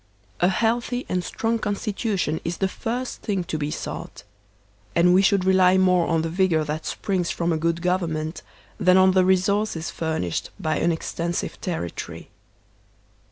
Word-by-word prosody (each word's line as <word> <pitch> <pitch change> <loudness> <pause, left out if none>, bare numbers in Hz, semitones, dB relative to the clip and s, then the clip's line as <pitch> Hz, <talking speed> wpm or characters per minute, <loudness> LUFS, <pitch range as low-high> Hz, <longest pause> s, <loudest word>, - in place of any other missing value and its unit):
A 175 - +4
healthy 235 +5 0
and 180 -1 0
strong 225 +4 -1
constitution 205 -5 -1
is 170 +1 -3
the 195 - +1
first 245 +6 -4
thing 195 -5 -1
to 170 -2 -5
be 145 0 -2
sought; - - -6 0.7
and 180 +1 +5
we 185 - +6
should 195 -1 +3
rely 185 0 +5
more 180 -2 +3
on 165 -1 +1
the 165 - -2
vigor 170 -2 +2
that 150 +1 -4
springs 185 -4 -1
from 170 0 0
a - - 0
good 165 +2 -1
government 165 -3 -1 0.4
than 185 0 +5
on 190 0 +6
the 185 0 +4
resources 190 -1 +1
furnished 160 - -2
by 155 -1 0
an 170 - +2
extensive 170 +1 -3
territory. 160 - -5
180 Hz, 160 wpm, -24 LUFS, 165-195 Hz, 0.7 s, we